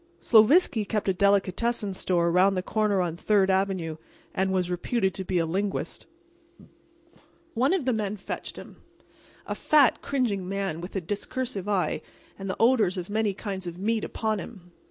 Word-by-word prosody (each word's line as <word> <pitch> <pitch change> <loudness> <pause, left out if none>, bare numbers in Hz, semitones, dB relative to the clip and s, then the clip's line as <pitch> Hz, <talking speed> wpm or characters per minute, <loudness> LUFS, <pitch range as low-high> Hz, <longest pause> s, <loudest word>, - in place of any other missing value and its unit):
Sloviski 230 - +5
kept 210 +1 -2
a - - +3
delicatessen 200 +3 +1
store 175 -2 +1
around 185 +3 +4
the 185 - -1
corner 210 -2 +1
on 170 -2 -2
Third 195 +1 +2
avenue, 190 -4 -1 0.4
and 190 0 0
was 180 -2 0
reputed 190 +2 0
to 190 - -4
be 185 0 -1
a 165 - +2
linguist. 195 +5 -3 1.5
One 255 +6 +2
of 370 -8 0
the 255 - +2
men 210 -1 -2
fetched 195 - -6
him—a - - -12
fat, 295 -4 +3
cringing 215 -9 -1
man, 195 -4 -3
with 180 +3 -8
a 195 - 0
discursive 205 +2 -4
eye 195 -3 0 0.4
and 195 0 -5
the 190 - -3
odors 225 -6 +3
of 180 +2 -5
many 215 -2 0
kinds 190 -3 -5
of 170 0 -6
meats 220 +3 0
upon 220 -2 -2
him. 180 -2 -10
195 Hz, 165 wpm, -26 LUFS, 185-220 Hz, 1.5 s, Sloviski